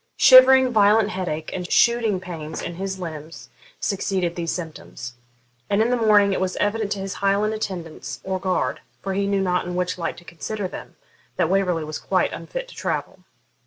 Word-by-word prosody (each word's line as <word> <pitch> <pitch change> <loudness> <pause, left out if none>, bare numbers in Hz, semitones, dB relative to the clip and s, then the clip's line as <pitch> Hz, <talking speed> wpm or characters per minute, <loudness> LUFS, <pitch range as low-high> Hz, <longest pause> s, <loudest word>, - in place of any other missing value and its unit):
Shivering, 260 0 +8
violent 210 0 +4
headache, 165 -5 -4
and 180 -1 -5
shooting 235 -5 +3
pains 160 -4 -7
in 175 - -4
his 190 0 -3
limbs 160 -2 -8 0.3
succeeded 185 -3 -1
these 170 -1 -3
symptoms; 155 -8 -6 0.6
and 200 0 +2
in 225 +3 +2
the - - +3
morning 210 -4 +4
it 185 - -1
was 185 -1 -1
evident 205 0 -1
to 200 - -7
his 195 0 -4
Highland 200 +2 +2
attendants 170 -9 -5
or 190 0 -2
guard, 180 -9 -1 0.2
for 195 - -2
he 200 +1 0
knew 200 -1 +1
not 180 -2 0
in 180 - -4
which 180 0 -2
light 170 - -3
to 175 - -13
consider 190 +5 -5
them, - - -10 0.4
that - - +1
Waverley 180 -4 +1
was 155 0 -5
quite - - 0
unfit - - -6
to - - -13
travel. 185 - -4
190 Hz, 185 wpm, -23 LUFS, 175-210 Hz, 0.6 s, Shivering